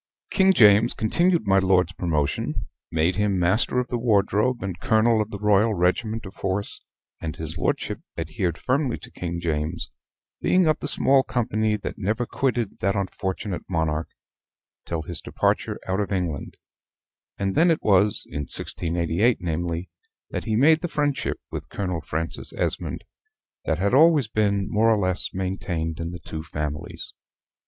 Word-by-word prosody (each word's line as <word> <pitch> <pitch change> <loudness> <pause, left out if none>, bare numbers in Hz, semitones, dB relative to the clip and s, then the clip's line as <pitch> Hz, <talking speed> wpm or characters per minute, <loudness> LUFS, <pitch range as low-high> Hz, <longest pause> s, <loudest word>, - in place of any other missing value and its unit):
King 190 -1 +5
James 110 - +6
continued 170 +7 +2
my 95 -1 +4
lord's 95 -1 +2
promotion 75 -6 -1 0.3
made 80 +3 +1
him 105 -2 +1
Master 90 +8 +2
of 125 - -1
the 120 - -1
Wardrobe 110 +1 +2
and 95 -3 -4
Colonel 110 +2 +3
of 105 - -3
the 105 - -5
Royal 105 +2 +3
Regiment 110 +6 0
of 95 - -9
Horse; 95 +1 -2 0.4
and 80 -2 -4
his - - -5
lordship - - -1 0.2
adhered 85 -2 -2
firmly 130 -1 0
to - - -12
King 85 -1 -4
James, 75 -2 -2 0.5
being 185 -1 +3
of 155 -1 +2
the - - -3
small 135 -2 +4
company 110 -4 0
that - - -6
never 110 +5 0
quitted 120 -4 -1
that 100 +1 +1
unfortunate 95 0 -3
monarch 80 -2 0 0.8
till 80 -2 -2
his 85 +1 -5
departure - - 0
out 95 +1 0
of 105 - -2
England; 90 -7 -3 0.8
and 95 -1 -1
then 170 +3 +4
it 165 - +1
was, 100 0 +3
in - - -5
1688 85 +7 0
namely, 85 +1 -3 0.4
that - - -4
he 110 -2 0
made 155 +7 +5
the 175 - -1
friendship 145 -3 -1
with - - -6
Colonel 90 -4 -3
Francis 80 +2 -3
Esmond, - - -2 0.6
that 80 - +1
had 100 +5 0
always 150 -3 +6
been, 100 -2 +1
more 110 +2 +3
or 110 - +4
less, 95 -2 -1
maintained 90 -4 -3
in 85 0 -3
the 90 - -6
two 80 -2 -7
families. 75 -1 -5
100 Hz, 160 wpm, -24 LUFS, 85-115 Hz, 0.8 s, James